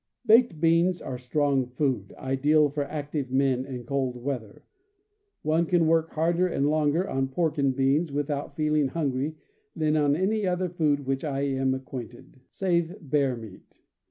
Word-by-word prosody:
Baked 225 -7 +5
beans 170 +2 +3
are 125 -1 -6
strong 135 0 0
food, 125 -6 -2
ideal 145 +3 +2
for 145 0 -2
active 145 -2 -4
men 130 -1 +1
in 125 -3 -6
cold 130 -1 -1
weather. 120 -5 -5 0.8
One 160 +2 +1
can 175 -2 +3
work 165 0 +2
harder 170 +3 +2
and 145 -5 0
longer 155 +4 +1
on 135 0 -1
pork 155 +3 -1
and 135 -2 +2
beans, 140 +4 +1
without 145 0 -3
feeling 150 -2 +1
hungry, 140 0 -2 0.4
than 155 -1 +1
on 145 -2 +3
any 200 +4 0
other 180 0 0
food 155 -4 +1
with 135 - -13
which 135 0 -1
I 140 -3 -2
am 135 -1 0
acquainted, 130 -1 -9
save 175 -2 0
bear 140 -3 0
meat. 110 -5 -13
145 Hz, 160 wpm, -26 LUFS, 135-160 Hz, 0.8 s, Baked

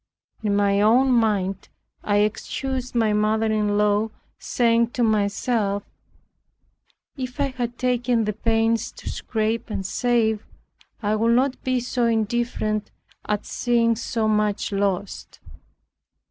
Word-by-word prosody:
In 210 -2 0
my 200 0 +2
own 250 +5 +4
mind 205 -5 +1 0.3
I 205 - +1
excused 255 +4 -4
my 220 -3 +2
mother 215 +1 +2
in 210 -1 +1
law, 210 +1 +2 0.3
saying 235 -1 +2
to 245 - 0
myself, 210 -1 0 1.3
"If 255 +1 -6
I 280 -1 +1
had 240 -2 -4
taken 245 -2 +1
the 210 - -1
pains 225 +1 +1
to - - -12
scrape 220 +1 -2
and 195 -3 -3
save, 220 0 +1 0.6
I 210 +1 +1
would 230 +2 +3
not 260 +1 +1
be 255 -1 +1
so 245 0 -1
indifferent 220 -1 -1 0.4
at 210 -1 -1
seeing 235 -1 +1
so 225 0 -1
much 210 -1 0
lost. 200 -1 -2
220 Hz, 125 wpm, -23 LUFS, 210-240 Hz, 1.3 s, own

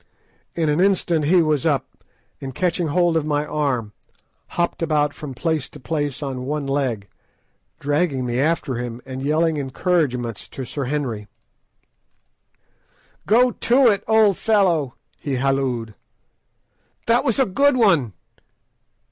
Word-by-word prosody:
In 165 -2 0
an 150 +2 +1
instant 175 -5 +2
he 175 +2 +4
was 150 -3 +1
up, 145 -5 -2 0.4
and 135 -1 -6
catching 175 -2 0
hold 175 +2 +2
of 160 - +2
my 150 0 -1
arm, 135 -8 -2 0.6
hopped 170 0 0
about 150 -3 +1
from 140 -4 -8
place 160 0 -1
to 150 - -12
place 145 0 -3
on 130 -2 -4
one 150 0 -2
leg, 130 -7 -1 0.7
dragging 145 -2 0
me 120 0 -1
after 140 -4 0
him, 120 -1 -5
and 130 0 -6
yelling 155 +3 +1
encouragements 130 - -1
to 130 - -6
Sir 140 +3 -4
Henry— 125 -7 -3 2.0
"Go 245 +3 +4 0.4
it, 200 - -2
old 220 -3 +4
fellow!" 175 - +2 0.2
he 140 -3 -3
hallooed. 130 -4 -1 1.1
"That 235 +2 +3
was 230 - +1
a 265 - +4
good 275 +7 +2
one! 170 - +3
150 Hz, 130 wpm, -21 LUFS, 130-170 Hz, 2.0 s, he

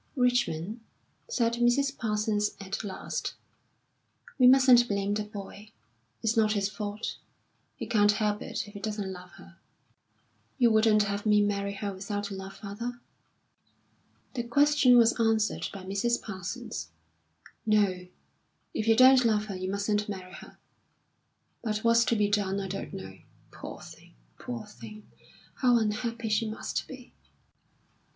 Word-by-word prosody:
"Richmond," 240 - 0 0.5
said 235 - +1
Mrs. 270 +4 +2
Parsons 210 -1 -1
at 195 +2 -5
last, 195 -3 -4 1.0
"we 250 - +7
mustn't 255 -2 +7
blame 200 -1 -1
the 210 0 -1
boy. 205 0 -10 0.5
It's 225 0 +1
not 215 -1 +3
his 200 -2 0
fault. 210 +1 -5 0.6
He - - -6
can't 205 -2 +3
help 210 0 -1
it - - -4
if 205 - -13
he 205 - -8
doesn't 205 -2 -4
love 180 0 -12
her." - - -16 1.0
"You 240 -4 +4
wouldn't 220 -1 +4
have 205 +1 -3
me 210 0 +5
marry 200 -1 -1
her 200 0 -4
without 205 +1 -4
love, 195 0 -7
father?" 230 +4 -6 1.3
The 250 - -2
question 255 +1 +4
was 235 0 +4
answered 225 -1 +1
by 195 -2 -9
Mrs. 200 +6 0
Parsons. 180 - -6 0.8
"No; 195 -4 +2 0.7
if 215 - -2
you 225 - +6
don't 255 +1 +7
love 215 -2 +2
her, 200 -3 -6
you 185 0 -4
mustn't 205 +1 -1
marry 185 -2 -7
her. - - -12 1.0
But 215 -2 -2
what's 230 0 +4
to 235 - +2
be 210 -1 +2
done, 200 -1 0
I 195 - -4
don't 195 +1 -5
know. 190 - -9 0.3
Poor - - -9
thing, - - -14 0.2
poor 120 -2 -6
thing, 210 - -12 0.5
how 245 -2 +4
unhappy 230 +1 -2
she 215 +1 +1
must 215 - -4
be!" 255 -2 -11
210 Hz, 145 wpm, -28 LUFS, 200-230 Hz, 1.3 s, we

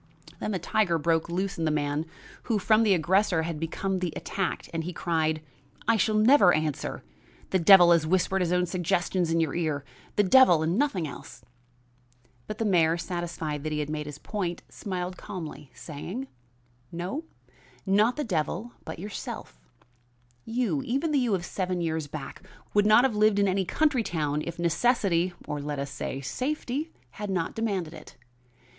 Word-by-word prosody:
Then - - -3
the 200 - 0
tiger 180 0 +1
broke 165 +1 +1
loose 190 +2 -2
in 165 - 0
the - - +2
man 150 +1 -1 0.4
who 230 -3 +1
from 215 +2 +3
the 210 -4 +4
aggressor 180 0 +2
had 160 -2 -4
become 185 +4 -2
the 180 -2 -2
attacked, 190 -4 -3
and 165 0 -2
he 180 +2 -5
cried: 160 -2 0 0.4
"I 230 - +5
shall 215 +1 +2
never 215 -3 +6
answer; 155 -2 -2 0.5
the 190 - +3
devil 175 0 +8
has 165 -2 +4
whispered 190 +2 +1
his 175 -1 0
own 180 0 +2
suggestions 175 0 0
in 165 0 +2
your 160 -4 0
ear; 155 -5 -1 0.3
the 205 - +4
devil 185 -6 +6
and 165 +3 0
nothing 210 - 0
else." 125 -3 -10 1.0
But 215 - -5
the 225 - -1
mayor, 170 -4 +3
satisfied 170 -4 -4
that 155 +1 -4
he 150 -1 -1
made 150 0 -4
his 145 -1 -7
point, 175 -1 -4
smiled 185 -2 -5
calmly, 155 -6 -7
saying: 175 - -6 0.7
"No, 180 - -4 0.6
not 210 +5 +3
the 300 - -2
devil, 185 - -2
but 160 - -7
yourself. 190 - -7 0.9
You, 225 - 0
even 275 - -1
the 290 - +3
you 240 -6 +2
of 175 -2 -4
seven 185 -1 -2
years 160 -3 -2
back, 145 -1 -7 0.3
would 205 0 +4
not 215 +3 +7
have 260 -5 +2
lived 210 -1 +4
in 200 0 +3
any 190 0 +1
country 290 - +2
town 150 -7 -1
if 170 0 -6
necessity, 180 0 +2
or 145 -1 -3
let 145 0 -4
us 140 0 -4
say, 135 0 -4
safety, 280 - -3 0.2
had 210 -1 -6
not 180 -4 -1
demanded 195 -8 -2
it. 155 - -12
180 Hz, 175 wpm, -27 LUFS, 160-210 Hz, 1.0 s, devil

